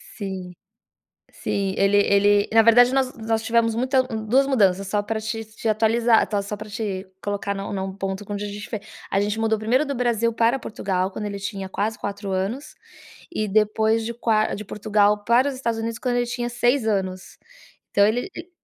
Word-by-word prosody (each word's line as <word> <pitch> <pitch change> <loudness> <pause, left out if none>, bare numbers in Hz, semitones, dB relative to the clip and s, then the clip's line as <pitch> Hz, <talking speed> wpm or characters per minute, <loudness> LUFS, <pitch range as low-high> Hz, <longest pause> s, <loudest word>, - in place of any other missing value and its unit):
Sim, 190 -3 -5 0.8
sim, 195 -1 -2
ele 195 +1 +3
ele 205 0 +4
na 225 0 +7
verdade, 245 +3 +6
nós 230 -4 0
tivemos 230 0 +2
muita 260 +2 +2
2 245 +2 +1
mudanças 200 -7 +2
só 205 +2 0
pra 220 +1 -3
te 225 +1 -4
te 220 +1 -5
atualizar, 225 +2 +3 0.2
só 205 +1 -5
pra 215 +1 -9
te 200 -2 -4 0.2
colocar 200 0 -2
num 195 0 -5
num 190 -1 -3
ponto 195 +1 -4
onde 205 0 -3
a - - -4
gente 205 +2 -7
foi 220 - -4 0.3
a 195 - +2
gente 205 +2 -1
mudou 225 -1 +1
primeiro 245 +7 +1
do 280 - -2
Brasil 235 -2 +1
para 230 +3 +2
Portugal 190 -4 -2
quando 210 - -6
ele 200 -1 -4
tinha 195 -1 -5
quase 215 +3 -2
4 200 0 -5
anos 200 +9 -3 0.6
e 215 -10 -1
depois 220 +2 +2
de 235 - -3
qua 225 -2 +1
de 210 - -6
Portugal 210 0 +1
para 245 +4 +4
os 280 - -3
Estados 235 -3 -2
Unidos 230 0 -3
quando 245 -2 -1
ele 245 - +1
tinha 240 0 -3
6 240 +1 +1
anos 190 -3 -2 0.5
então 200 - +5
ele 245 - -1
e 335 +2 -9
215 Hz, 190 wpm, -23 LUFS, 200-235 Hz, 0.8 s, na